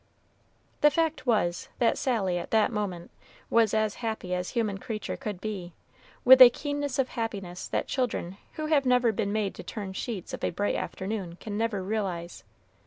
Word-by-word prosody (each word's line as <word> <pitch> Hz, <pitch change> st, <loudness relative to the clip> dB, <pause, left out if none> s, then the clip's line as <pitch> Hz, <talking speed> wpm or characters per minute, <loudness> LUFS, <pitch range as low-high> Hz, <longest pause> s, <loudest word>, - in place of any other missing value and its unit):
The 295 Hz, -, +7 dB
fact 315 Hz, -3 st, -1 dB
was, 175 Hz, -7 st, +1 dB
that 235 Hz, -, +3 dB
Sally, 195 Hz, -9 st, 0 dB
at -, -, -7 dB
that 220 Hz, +1 st, +3 dB
moment, 200 Hz, -6 st, -4 dB, 0.4 s
was 230 Hz, -2 st, +4 dB
as 215 Hz, -1 st, +1 dB
happy 220 Hz, -6 st, -3 dB
as 180 Hz, 0 st, -2 dB
human 215 Hz, -4 st, -1 dB
creature 215 Hz, +1 st, -4 dB
could 210 Hz, -8 st, -5 dB
be, 190 Hz, -4 st, -5 dB, 0.5 s
with 260 Hz, +1 st, +9 dB
a 250 Hz, -, +13 dB
keenness 285 Hz, 0 st, -3 dB
of 265 Hz, -2 st, +1 dB
happiness 200 Hz, -7 st, -4 dB
that -, -, -1 dB
children 215 Hz, -8 st, -2 dB, 0.2 s
who 310 Hz, -, -4 dB
have 295 Hz, -4 st, +2 dB
never 250 Hz, -2 st, +4 dB
been 205 Hz, -1 st, -1 dB
made 210 Hz, -2 st, 0 dB
to -, -, -9 dB
turn 200 Hz, -3 st, -6 dB
sheets 210 Hz, -3 st, -5 dB
of -, -, -6 dB
a -, -, +2 dB
bright 200 Hz, +4 st, -1 dB
afternoon 190 Hz, -3 st, -4 dB
can 205 Hz, +3 st, -6 dB
never 215 Hz, -3 st, -1 dB
realize. 185 Hz, -4 st, -3 dB
215 Hz, 175 wpm, -28 LUFS, 190-245 Hz, 0.5 s, a